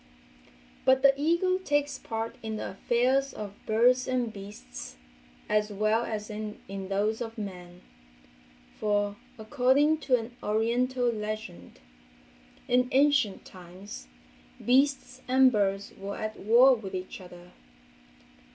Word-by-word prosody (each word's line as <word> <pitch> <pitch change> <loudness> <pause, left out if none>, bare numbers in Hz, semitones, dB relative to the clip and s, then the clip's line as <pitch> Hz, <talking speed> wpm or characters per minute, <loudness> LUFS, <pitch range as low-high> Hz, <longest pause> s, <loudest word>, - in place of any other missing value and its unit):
But 260 0 +4
the 275 0 +7
eagle 340 +6 +1
takes 290 -5 -1
part 225 0 -4
in 220 -1 -4
the - - -4
affairs 255 +7 +1
of 205 -2 -6
birds 245 +3 +3
and 245 -3 -1
beasts, 195 - -9 0.5
as 210 0 +1
well 215 +3 +1
as 210 -1 -4
in 210 0 -6
those 195 +3 -2
of 230 0 -5
men, 180 -4 -8 1.0
for, 205 -1 0 0.2
according 270 +7 +2
to 265 -4 +2
an 235 +1 -8
oriental 240 +3 +1
legend, 210 - -6 0.9
in 250 0 +2
ancient 275 -7 +2
times 185 +3 -11 0.6
beasts 260 0 +2
and 260 0 +5
birds 200 -2 -1
were 200 +1 -6
at 215 0 -5
war 240 +6 +6
with 205 -6 -5
each 185 +1 -6
other. 175 -1 -13
225 Hz, 120 wpm, -28 LUFS, 205-255 Hz, 1.0 s, the